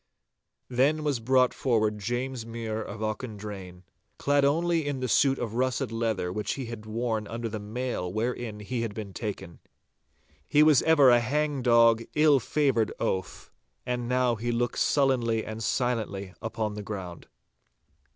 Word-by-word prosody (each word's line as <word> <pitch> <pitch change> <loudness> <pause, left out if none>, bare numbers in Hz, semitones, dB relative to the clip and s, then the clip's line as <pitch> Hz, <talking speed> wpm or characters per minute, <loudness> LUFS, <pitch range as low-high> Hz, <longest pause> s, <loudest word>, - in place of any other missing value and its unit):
Then 140 +5 +2
was 145 -5 0
brought 125 +2 +3
forward 110 -4 +1
James 120 +3 -3
Mure 115 -1 -4
of 105 0 -7
Auchendrayne, 105 -5 -6 0.3
clad 145 0 +2
only 165 +2 +2
in 140 -2 -2
the 130 - -2
suit 135 +3 +3
of 110 -2 -4
russet 125 -2 0
leather 110 -6 -1
which 105 +1 -2
he 135 - -5
had 115 -2 -8
worn 110 -1 -2
under 115 +1 -4
the 110 -1 -5
mail 105 -3 -3
wherein 110 0 -3
he 120 +3 -3
had 110 -3 -4
been 105 -3 -6
taken. 95 -5 -6 0.9
He 150 - +5
was 155 -3 +6
ever 145 -5 +6
a 120 - +6
hang 145 +3 -1
dog, 115 -2 +5
ill 150 -2 +5
favoured 130 -4 +1
oaf, 95 -2 -3 0.3
and 125 -1 -2
now 125 -1 +2
looked 120 +1 -1
sullenly 120 -6 +2
and 110 +1 -6
silently 110 -6 -1
upon 110 -1 -3
the 105 - -6
ground. 95 -5 -7
115 Hz, 150 wpm, -27 LUFS, 110-130 Hz, 0.9 s, was